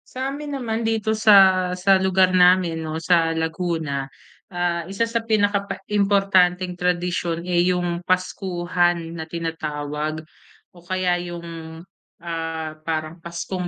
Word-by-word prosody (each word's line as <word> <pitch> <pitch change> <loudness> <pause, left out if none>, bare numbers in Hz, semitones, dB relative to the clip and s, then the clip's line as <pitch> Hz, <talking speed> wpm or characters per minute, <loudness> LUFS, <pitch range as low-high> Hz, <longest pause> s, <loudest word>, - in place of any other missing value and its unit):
Sa 265 +1 -2
amin 290 0 -5
naman 225 -3 -2
dito 220 -1 0
sa 195 -4 +6
sa 190 +1 +3
lugar 190 -1 +3
namin 180 -2 +4
'no, 160 -1 -4
sa 165 -2 +3
Laguna. 160 -4 -2 0.4
Ah, 175 -1 -2
isa 195 +4 -1
sa 230 0 0
pinaka 205 -2 +1
pa - - -3 0.2
importanteng 190 -3 +2
tradisyon, 175 -1 -1
eh, 175 0 +1
'yong, 175 -1 0
Paskuhan 175 -2 0
na 160 -1 -6
tinatawag 155 -2 -4 0.5
o 175 - -17
kaya 180 0 -1
'yong, 170 -2 -8 0.4
ah, 165 -2 -4
parang 155 +1 -3
Paskong 170 +2 -5
175 Hz, 125 wpm, -22 LUFS, 165-190 Hz, 0.5 s, sa